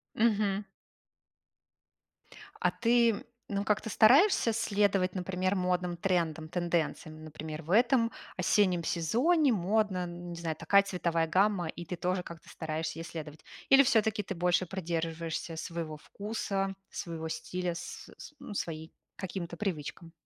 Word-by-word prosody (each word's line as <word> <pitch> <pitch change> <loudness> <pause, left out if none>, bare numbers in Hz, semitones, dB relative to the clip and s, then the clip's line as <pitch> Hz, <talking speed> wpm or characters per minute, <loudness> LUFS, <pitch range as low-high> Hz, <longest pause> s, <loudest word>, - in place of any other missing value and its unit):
Мгм. 210 -3 +2 2.0
А - - +3
ты, 235 -1 +4
м, 205 - -5 0.2
ну, 200 -1 -1
как-то 215 +2 0
стараешься 245 - +5
следовать, 200 -4 +1
например, 185 +1 -1
модным 180 -1 0
трендам, 165 -4 0
тенденциям? 165 -2 -2
Например, 155 0 -7
в 165 +3 -7
этом 235 +1 +4 0.3
осеннем 180 -1 +3
сезоне 255 - +2
модно, 200 0 +1
н 175 0 -7
не - - -5
знаю, 160 -2 -2
такая 200 0 +4
цветовая 170 -4 0
гамма, 190 0 +2
и 170 - -6
ты 180 - -4
тоже 180 +1 -1
как-то 170 -2 -11
стараешься 160 0 -4
ей - - -4
следовать? 155 -2 -8 0.3
Или 270 +1 +8
всё-таки 220 -4 +2
ты 195 - -5
больше 180 +1 +2
придерживаешься 165 -2 -3
своего 165 -2 -4
вкуса, 195 +1 -3 0.2
своего 165 -3 -5
стиля, 180 +2 -3
св 180 - -8 0.2
ну, - - -8
своим 160 -4 -4 0.3
каким-то 175 -3 -5
привычкам? 170 -2 -4
180 Hz, 135 wpm, -30 LUFS, 165-205 Hz, 2.0 s, Или